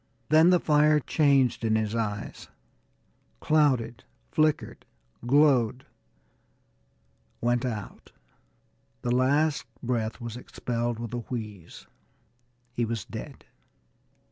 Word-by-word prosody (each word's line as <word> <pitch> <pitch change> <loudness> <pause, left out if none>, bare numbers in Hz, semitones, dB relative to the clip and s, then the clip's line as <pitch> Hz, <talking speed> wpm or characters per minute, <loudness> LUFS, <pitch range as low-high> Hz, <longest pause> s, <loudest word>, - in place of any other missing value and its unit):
Then 160 +3 +6
the 180 -1 +5
fire 150 -1 +4
changed 140 -5 +2
in 110 -1 +2
his 110 -1 -1
eyes, 105 -3 -4 0.9
clouded, 135 - +1 0.3
flickered, 155 -1 0 0.4
glowed 130 -3 +3 1.5
went 120 +1 0
out. 110 -5 -6 0.9
The 120 0 +1
last 145 +4 +2 0.2
breath 115 -2 -2
was 120 -2 -6
expelled 120 -1 -3
with 115 0 -6
a 120 - -2
wheeze. 110 -7 -7 0.9
He 120 - -1
was 115 -4 -3
dead. - - -9
120 Hz, 95 wpm, -27 LUFS, 115-145 Hz, 1.5 s, Then